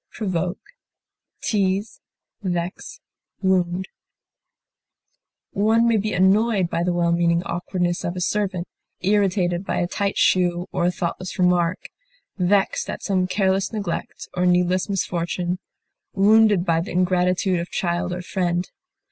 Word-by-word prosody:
displease, 200 0 0 0.5
irritate, 175 -1 -1
tease, - - -12 0.4
One 185 -1 +1 2.0
may 230 -1 +3
be 215 +1 -1
annoyed 190 0 +3
by 170 - 0
the 180 +1 +1
well 170 -1 +1
meaning 170 0 +2
awkwardness 175 0 -2
of 175 - -3
a - - -3
servant, 185 -1 -1 0.3
irritated 185 -2 +1
by - - -2
a 175 - +1
tight 200 +3 -2
shoe 175 -1 +2
or 175 -2 0
a - - +2
thoughtless 180 +1 -4
remark, 180 -1 +1 0.5
vexed 195 +1 +1
at - - -5
some 185 -2 +1
careless 190 0 +1
neglect 200 -6 -4
or 180 0 +2
needless 180 +2 +2
misfortune, 180 -1 -2 0.6
wounded 205 -2 +5
by 165 -2 +2
the 175 - -6
ingratitude 180 0 +1
of 170 - -5
child 175 0 -1
or 180 0 -4
friend. 175 -1 -1
180 Hz, 125 wpm, -22 LUFS, 175-195 Hz, 2.0 s, wounded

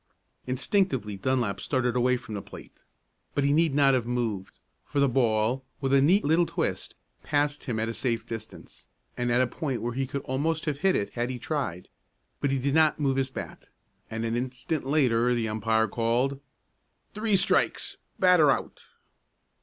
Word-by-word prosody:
Instinctively 130 - 0
Dunlap 120 0 0
started 125 -3 0
away 125 +1 +3
from 115 -3 -9
the 100 - -4
plate, - - -13 0.5
but 145 - +1
he 140 +1 +3
need 160 -2 +2
not 140 -2 +5
have 125 -3 0
moved, 115 -6 -3 0.3
for 145 - -3
the 140 - +4
ball, 120 0 +1 0.2
with 135 -1 -1
a 135 - +6
neat 180 +9 +4
little 165 +3 +3
twist, - - -3 0.3
passed 145 0 0
him 115 -5 -2
at 110 - 0
a 115 - -3
safe 115 0 -2
distance, 115 -2 -9 0.3
and 120 0 -1
at 120 +1 +3
a - - +2
point 130 0 -3
where 120 +2 -3
he 135 +1 -2
could 140 +1 -4
almost 155 +5 -1
have 145 -2 -2
hit 190 +3 +3
it 100 - -1
had 120 +1 -2
he 130 - -4
tried. 120 - -3 0.5
But 140 - 0
he 135 - +1
did 135 +2 -1
not 155 -1 +4
move 135 -2 +1
his 135 0 0
bat, - - -8 0.4
and 110 +1 -3
an 115 0 -1
instant 130 +4 -3
later 125 -4 +2
the 115 -2 -1
umpire 110 +1 +1
called: 120 +5 0 0.7
"Three 215 -1 +1
strikes 190 0 +1 0.2
batter 180 -5 +5
out!" - - -1
130 Hz, 180 wpm, -27 LUFS, 115-145 Hz, 0.7 s, a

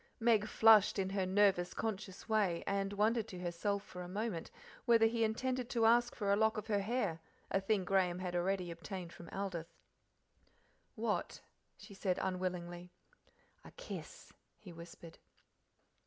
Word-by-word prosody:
Meg 225 -2 +3
flushed 220 -2 +6
in 190 -1 -1
her 195 -2 0
nervous, 190 -2 +3
conscious 205 -3 -4
way, 205 -6 +1
and 195 0 -1
wondered 215 +2 +1
to 185 - -8
herself 180 +3 -2
for 180 - -9
a 175 - -6
moment 205 -3 -3 0.4
whether 230 -2 +5
he 230 0 +1
intended 250 +3 -1
to 230 -3 +2
ask 240 +2 +4
for 200 -3 +1
a - - +5
lock 220 +1 +2
of 215 - -4
her 210 -2 +1
hair, 200 -6 -1 0.3
a 195 - +2
thing 195 -1 +1
Graham 185 -2 +2
had 180 -1 -4
already 180 0 0
obtained 180 0 -7
from 170 -1 -11
Aldith. 185 -4 -5 1.2
"What?" - - -2 0.4
she 205 0 -12
said 190 -2 -1
unwillingly. 180 -1 -3 0.7
"A - - -11
kiss," - - -9 0.2
he 185 -5 -12
whispered. 170 0 -12
195 Hz, 155 wpm, -35 LUFS, 180-220 Hz, 1.2 s, flushed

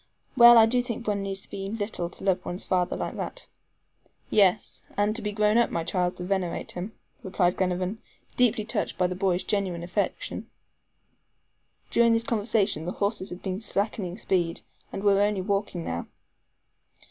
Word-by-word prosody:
Well, 240 -1 +9
I 225 - +8
do 245 +2 +2
think 235 -1 -5
one 205 -1 0
needs 195 0 -3
to - - -6
be 195 0 -4
little 205 -5 -2
to - - -11
love 190 -2 +1
one's 180 +2 -5
father 180 -1 0
like - - -4
that." - - -5 0.9
"Yes, 205 0 +2
and 205 +1 +2
to 235 - -1
be 210 0 -2
grown 210 +2 +3
up, 235 - +3
my 165 - -2
child, 180 +1 -1
to 180 - -5
venerate 185 -2 -2
him," 190 +5 -6 0.3
replied 185 -2 +1
Glenarvan, 185 +3 -1 0.3
deeply 240 -3 +2
touched 215 - -2
by 180 - +2
the 180 - -1
boy's 185 -1 0
genuine 190 -5 -1
affection. 180 +4 -3 1.4
During 235 -1 +4
this 230 0 +2
conversation 210 -7 0
the 180 - -3
horses 200 -1 -1
had 180 - -9
been 190 +1 -3
slackening 200 -4 -2
speed, 175 -6 0 0.3
and 195 - -5
were 200 -1 +4
only 205 -2 +1
walking 195 -3 -2
now. 85 +1 -4
195 Hz, 170 wpm, -26 LUFS, 180-215 Hz, 1.4 s, Well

